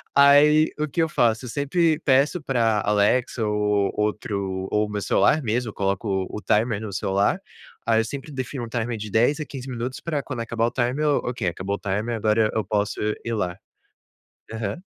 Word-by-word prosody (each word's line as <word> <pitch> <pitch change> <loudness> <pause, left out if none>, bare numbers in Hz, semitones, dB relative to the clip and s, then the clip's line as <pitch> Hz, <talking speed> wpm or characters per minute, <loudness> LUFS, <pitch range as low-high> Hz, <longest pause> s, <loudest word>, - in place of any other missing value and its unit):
Aí, 145 +2 +6
o 150 - 0
que 165 - -1
eu 160 - -1
faço? 115 -4 +1
Eu - - -6
sempre 155 +4 +1
peço 140 +5 +3
pra 115 -7 +1
Alexa 105 +3 +2
ou 105 -1 +1
outro 100 -3 -2
ou 105 0 +1
o - - -10
meu 105 -1 -3
celular 155 - +3
mesmo. 120 0 -1
Eu - - -20
coloco 95 -1 -1
o 105 - -6
timer 105 +3 +1
no 105 -2 -6
celular. 95 +1 +1 0.5
Aí, 115 -1 +3
eu - - -3
sempre 140 +4 -7
defino 130 -1 -4
um - - -10
timer 115 0 -2
de 105 -1 -7
10 120 +8 +3
a 150 - -3
15 135 -1 -8
minutos 125 +1 -4
pra 150 -4 -3
quando 130 -4 -6
acabar 115 0 0
o - - -3
timer 130 +4 0
"ok, 125 -7 0
acabou 95 +4 -3
o - - -9
timer. 105 +4 -2
Agora, 110 0 +2
eu 110 - +1
posso 105 0 -1 0.3
ir 115 - -2
lá". 90 -4 -2 1.0
Aham. 110 - -4
115 Hz, 195 wpm, -24 LUFS, 105-135 Hz, 1.0 s, Aí